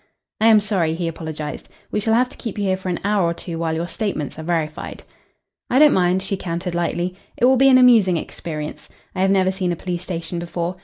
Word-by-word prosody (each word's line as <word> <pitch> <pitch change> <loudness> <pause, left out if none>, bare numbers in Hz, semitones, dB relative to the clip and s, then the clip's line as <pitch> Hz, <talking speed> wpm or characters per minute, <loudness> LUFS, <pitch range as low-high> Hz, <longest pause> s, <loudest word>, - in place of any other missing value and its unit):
"I 220 - +4
am 220 -1 +7
sorry," 185 -6 0
he 170 0 -2
apologised. 155 -2 -6 0.2
"We - - 0
shall 220 +2 +1
have 250 +2 +3
to - - -16
keep 225 -5 -6
you 205 - -1
here 190 -1 +2
for 185 0 -6
an 175 - -2
hour 205 -1 +2
or 170 0 0
two 165 -1 -6
while 165 -1 -1
your 170 +2 -2
statements 165 - -3
are - - -6
verified." 160 -2 -3 0.7
"I 250 - +2
don't 300 +1 +7
mind," 185 +1 +2
she 195 0 -2
countered 175 0 -4
lightly. 175 +1 -1 0.2
"It - - +3
will 260 +1 +6
be 270 +1 +5
an 255 - +7
amusing 225 -8 +5
experience. 155 -2 -6 0.2
I 185 - -2
have 190 - +3
never 190 -1 +3
seen 185 -2 -2
a - - -1
police 175 0 -4
station 170 -1 -5
before. 170 +1 -4
180 Hz, 235 wpm, -21 LUFS, 170-205 Hz, 0.7 s, am